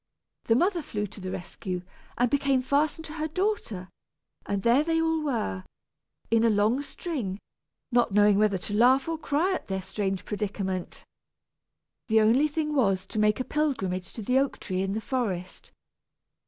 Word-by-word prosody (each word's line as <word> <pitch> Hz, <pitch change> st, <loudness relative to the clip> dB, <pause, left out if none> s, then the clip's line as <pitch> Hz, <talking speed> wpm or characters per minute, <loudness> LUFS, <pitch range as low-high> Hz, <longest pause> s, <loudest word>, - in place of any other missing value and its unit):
The 225 Hz, -, +3 dB
mother 355 Hz, -, +2 dB
flew 210 Hz, -7 st, -3 dB
to 205 Hz, 0 st, -11 dB
the 185 Hz, -, -4 dB
rescue, 185 Hz, -1 st, -5 dB, 0.3 s
and 245 Hz, -, +3 dB
became 275 Hz, 0 st, +2 dB
fastened 295 Hz, +4 st, +1 dB
to 305 Hz, -, -8 dB
her 310 Hz, -1 st, -2 dB
daughter; 320 Hz, -, -2 dB, 0.6 s
and 200 Hz, -1 st, -1 dB
there 245 Hz, +5 st, +4 dB
they 325 Hz, 0 st, +1 dB
all 325 Hz, -1 st, +1 dB
were, 220 Hz, -, -2 dB, 0.7 s
in 230 Hz, 0 st, +4 dB
a 230 Hz, -, +5 dB
long 215 Hz, +5 st, +2 dB
string, 275 Hz, -, -4 dB, 0.5 s
not 240 Hz, -2 st, +3 dB
knowing 205 Hz, 0 st, +5 dB
whether 210 Hz, -2 st, +3 dB
to 195 Hz, +3 st, -6 dB
laugh 255 Hz, +6 st, +4 dB
or 325 Hz, -1 st, -2 dB
cry 315 Hz, +5 st, +1 dB
at -, -, -4 dB
their 190 Hz, -1 st, -3 dB
strange 195 Hz, 0 st, -3 dB
predicament. 195 Hz, -3 st, -3 dB, 1.0 s
The 220 Hz, -1 st, +4 dB
only 235 Hz, +7 st, +4 dB
thing 300 Hz, 0 st, -2 dB
was 195 Hz, -9 st, +2 dB
to 215 Hz, -, -4 dB
make 210 Hz, +1 st, +3 dB
a -, -, 0 dB
pilgrimage 195 Hz, -, -1 dB
to 225 Hz, -, -6 dB
the 255 Hz, +5 st, +3 dB
oak 275 Hz, 0 st, -1 dB
tree 185 Hz, -1 st, -2 dB
in 195 Hz, 0 st, -1 dB
the 220 Hz, -, -2 dB
forest. 200 Hz, -9 st, -3 dB
225 Hz, 170 wpm, -27 LUFS, 195-290 Hz, 1.0 s, a